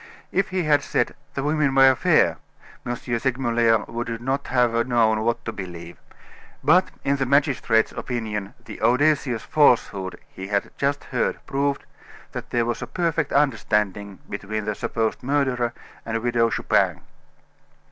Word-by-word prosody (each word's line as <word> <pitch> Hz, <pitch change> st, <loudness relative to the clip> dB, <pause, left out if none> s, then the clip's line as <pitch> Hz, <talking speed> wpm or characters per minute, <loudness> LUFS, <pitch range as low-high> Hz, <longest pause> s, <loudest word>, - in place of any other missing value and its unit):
If 195 Hz, -, +1 dB
he 185 Hz, -1 st, -1 dB
had 145 Hz, -2 st, +3 dB
said: -, -, 0 dB, 0.2 s
"The 140 Hz, -, -2 dB
women 150 Hz, -2 st, +1 dB
were 135 Hz, 0 st, +7 dB
fair," -, -, +3 dB, 0.5 s
M. 120 Hz, -, -1 dB
Segmuller 120 Hz, -2 st, +1 dB
would 115 Hz, 0 st, -4 dB
not 135 Hz, +3 st, -2 dB
have 120 Hz, -2 st, +2 dB
known 110 Hz, -3 st, +2 dB
what 115 Hz, +1 st, -1 dB
to 110 Hz, -, -2 dB
believe, 85 Hz, -4 st, -8 dB, 0.6 s
but 175 Hz, +6 st, +4 dB
in 140 Hz, +1 st, +1 dB
the 135 Hz, -1 st, -1 dB
magistrate's 130 Hz, -5 st, +2 dB
opinion 110 Hz, -5 st, -4 dB
the -, -, -9 dB
audacious 130 Hz, -2 st, +2 dB
falsehood 105 Hz, -10 st, +2 dB
he 95 Hz, -, -9 dB
had 100 Hz, 0 st, -1 dB
just 140 Hz, 0 st, -1 dB
heard 125 Hz, -3 st, -1 dB
proved 140 Hz, 0 st, -1 dB, 0.5 s
that -, -, -7 dB
there 120 Hz, -1 st, +1 dB
was 120 Hz, 0 st, -2 dB
a 125 Hz, -, -4 dB
perfect 165 Hz, 0 st, -1 dB
understanding 105 Hz, -7 st, 0 dB
between 105 Hz, +1 st, -4 dB
the 105 Hz, -, -1 dB
supposed 115 Hz, 0 st, -2 dB
murderer 130 Hz, -3 st, 0 dB, 0.3 s
and 115 Hz, 0 st, -3 dB
Widow 120 Hz, -1 st, +2 dB
Chupin. -, -, +1 dB
120 Hz, 145 wpm, -23 LUFS, 110-140 Hz, 0.6 s, were